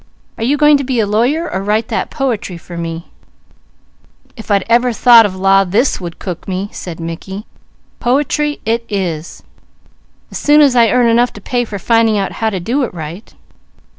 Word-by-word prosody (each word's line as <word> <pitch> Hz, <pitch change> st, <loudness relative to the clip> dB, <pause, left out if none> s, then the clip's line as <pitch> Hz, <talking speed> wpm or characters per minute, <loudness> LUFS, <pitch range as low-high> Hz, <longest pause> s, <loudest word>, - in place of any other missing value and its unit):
Are -, -, -2 dB
you 275 Hz, +5 st, +1 dB
going 295 Hz, 0 st, +5 dB
to 280 Hz, -, -3 dB
be 255 Hz, -2 st, -1 dB
a 220 Hz, -, +2 dB
lawyer 245 Hz, +11 st, 0 dB
or 190 Hz, -, -3 dB
write 215 Hz, +3 st, -1 dB
that -, -, -2 dB
poetry 230 Hz, -, -3 dB
for 175 Hz, +1 st, -11 dB
me?" 165 Hz, 0 st, -6 dB, 1.2 s
"If 220 Hz, -3 st, -11 dB
I'd 200 Hz, -1 st, +2 dB
ever 240 Hz, +2 st, +3 dB
even 235 Hz, -, -4 dB
thought 235 Hz, -2 st, +7 dB
of 190 Hz, -, -8 dB
law, 195 Hz, +1 st, +3 dB
this 205 Hz, +6 st, 0 dB
would 170 Hz, -2 st, -7 dB
cook 180 Hz, -3 st, -7 dB
me," 190 Hz, +1 st, -3 dB
said 175 Hz, -2 st, -8 dB
Mickey. 170 Hz, +5 st, -7 dB, 0.5 s
"Poetry 295 Hz, +3 st, 0 dB
it 230 Hz, +1 st, 0 dB
is, 175 Hz, -5 st, -4 dB, 0.9 s
as -, -, -5 dB
soon 295 Hz, +1 st, +4 dB
as 280 Hz, -4 st, +5 dB
I 230 Hz, -2 st, +5 dB
earn 250 Hz, +2 st, +3 dB
enough 235 Hz, +1 st, +3 dB
to -, -, -10 dB
pay 245 Hz, +4 st, -1 dB
for 210 Hz, -2 st, -6 dB
finding 225 Hz, +2 st, +2 dB
out 195 Hz, -1 st, -1 dB
how 225 Hz, -, -1 dB
to 195 Hz, -3 st, -4 dB
do 240 Hz, +11 st, -1 dB
it 250 Hz, -, -2 dB
right." 165 Hz, +6 st, -8 dB
220 Hz, 195 wpm, -15 LUFS, 190-245 Hz, 1.2 s, thought